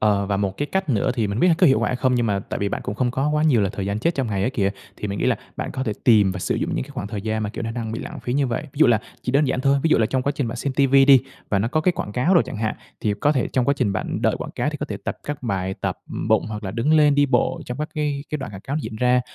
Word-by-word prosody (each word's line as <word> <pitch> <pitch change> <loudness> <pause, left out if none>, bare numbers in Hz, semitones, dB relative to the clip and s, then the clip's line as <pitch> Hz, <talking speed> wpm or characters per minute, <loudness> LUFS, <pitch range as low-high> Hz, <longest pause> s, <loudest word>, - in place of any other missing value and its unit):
Ờ, 100 -2 +2
và 100 0 -1
một 100 -1 -2
cái 145 - -1
cách 190 +3 -2
nữa 110 -7 +2
thì 110 -3 0
mình 100 +3 -2
biết 180 - +5
có - - +5
hiệu 135 - +4
quả - - +1
hay 125 - -1
không, 130 0 +1
nhưng 120 -1 +1
mà 100 -3 +1
tại - - -5
vì 100 - 0
bạn - - -3
cũng 100 - -4
không 125 0 0
có 135 +4 0
quá 150 0 +1
nhiều 130 -9 +4
là 100 - +1
thời 100 -1 -4
gian 100 +2 -2
chết 170 +8 0
trong 135 -3 -1
ngày 100 -3 -1
ấy 120 - +1
kìa, 100 -7 0 0.3
thì 105 - -4
mình 100 0 -3
nghĩ - - 0
là - - +3 0.2
bạn - - -3
có 130 - -3
thể 110 - -1
tìm 105 -5 +5
và 95 - -5
sử - - -1
dụng - - -2
những - - -1
cái - - -14
khoảng 120 -7 -5
thời 105 -2 -5
gian 110 0 -2
mà, 105 - -2
kiểu, 115 - -5
nó 115 - -3
đang 115 -2 -4
bị 115 - -4
lãng - - -7
phí 120 - -3
như 140 -1 +2
vậy. 115 - -2
Ví 140 -2 -14
dụ 155 - +7
là 115 -3 +4 0.2
chỉ 125 - -2
đơn 145 +3 +3
giản 130 0 0
thôi, 140 0 +3
ví 165 - +3
dụ - - +5
là 110 - +3
trong 130 +3 0
quá 140 - 0
trình 135 -6 -1
bạn 115 - -4
xem 140 -2 -2
ti 140 0 +3
vi 135 0 +6
đi, 135 -1 +8 0.3
và 100 - +2
nó 110 - +1
có 155 +6 0
cái 180 - +3
quảng 105 - -5
cáo 155 - +2
đồ 170 - +7
chẳng - - -6
hạn, 110 0 -1 0.2
thì 105 - 0
có 145 - +3
thể 135 -5 0
trong 125 -2 0
quá 140 - +3
trình 100 - +1
bạn 95 - -3
đợi - - +2
quảng - - -6
cáo - - -1
thì - - -6
có - - -3
thể - - -5
tập - - -3
các 145 -2 -5
bài 95 -4 -1
tập - - -3 0.3
bụng, - - +3
hoặc 105 0 -6
là 95 - -3
đứng 120 +7 +1
lên 150 -2 +5
đi 145 0 +4
bộ 135 - +1
trong 125 - -5
các 150 +1 -3
cái 145 -3 -2
cái 150 - -2
đoạn 135 - -6
quảng 95 -1 -9
cáo 140 +3 -3
diễn 130 -7 -5
ra. 125 +2 +3
125 Hz, 365 wpm, -22 LUFS, 105-140 Hz, 0.3 s, đi